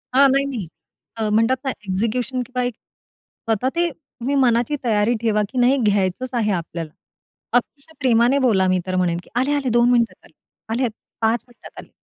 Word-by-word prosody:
हां. 275 +1 +7
नाही, 275 +1 +2
नाही. 235 -10 -4 0.5
अ, 220 -1 -1
म्हणतात 225 +4 +3
ना 265 - +1 0.2
एक्झिक्युशन 230 +6 -1
किंवा 250 -1 -2
एक 245 -1 -1
स्वतः 225 +4 -5
ते 345 0 +2
तुम्ही 275 -2 -5
मनाची 245 +1 +2
तयारी 215 0 +2
ठेवा, 215 -2 +2
की 255 - -7
नाही 255 +3 +4
घ्यायचंच 205 +1 0
आहे 220 -3 +1
आपल्याला. 170 -3 -4 0.7
अतिशय 280 +5 -5
प्रेमाने 245 +1 +3
बोला. 210 -8 +3
मी 185 0 +2
तर 185 - -1
म्हणेन 175 -2 +1
की - - -20
आले, 260 +4 +1
आले, 270 -3 -1
2 240 +1 +4
मिनिटांत 235 -2 +1
आले. - - -21 0.4
आले, 250 +1 +1 0.3
5 225 +1 +1
मिनिटांत 240 - -14
आले. - - -21
240 Hz, 180 wpm, -21 LUFS, 215-260 Hz, 0.7 s, हां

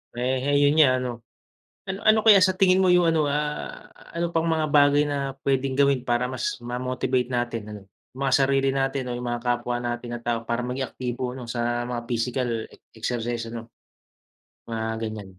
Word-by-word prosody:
Eh, 130 +3 +1
'yon 145 +1 +4
nga 130 -5 +5
ano. 120 -3 -5 0.7
Ano 190 +1 -3
ano 215 0 +6
kaya 210 -3 +8
sa 185 0 +4
tingin 185 -1 +4
mo 190 - +3
yung 175 -2 +4
ano, 160 -2 +1
ah, 150 +1 -3 0.2
ano 170 0 -1
pang 165 0 0
mga 160 -2 0
bagay 145 0 +5
na 140 -2 -2
pwedeng 135 -1 0
gawin 140 -2 +2
para 120 +1 +1
mas 130 -1 -3
ma-motivate 125 +1 -1
natin 120 -2 -1
ano, 105 -1 -8 0.3
yung 135 - -6
mga 135 -1 +2
sarili 135 0 +2
natin 135 -1 -1
o 120 - -3
yung 125 - -6
mga 120 0 -3
kapwa 120 0 -1
natin 120 0 -4
na 120 - -7
tao 115 -1 -2
para 120 0 -1
maging 125 +2 -3
aktibo 125 0 -4
'no 125 -3 -8
sa 120 0 -1
mga 120 -1 -4
physical 120 +1 -1 0.5
exercise 115 0 -3
ano, 115 0 -7 1.0
mga 115 -1 -3 0.2
ganyan. 100 -4 -8
125 Hz, 185 wpm, -25 LUFS, 120-145 Hz, 1.0 s, kaya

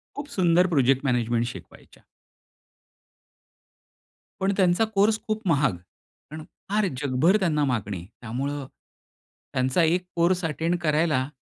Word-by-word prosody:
खूप 285 0 -6
सुंदर 180 -1 +3
project 135 -4 +2
management 120 -2 +1
शिकवायच्या. 120 - -11 2.4
पण 195 +1 +1
त्यांचा 185 +3 +3
कोर्स 215 +2 +3
खूप 215 0 -2
महाग. 145 - +2 0.6
कारण 155 0 -7 0.3
फार 210 +1 +1 0.2
जगभर 145 +9 +3
त्यांना 155 -6 +1
मागणी 105 -8 -3 0.2
त्यामुळं, 135 +5 -4 0.9
त्यांचा 130 +7 +1
एक 175 +3 +2
कोर्स 175 +1 +2
अटेंड 165 +3 -1
करायला 150 -4 +1
155 Hz, 110 wpm, -25 LUFS, 130-180 Hz, 2.4 s, सुंदर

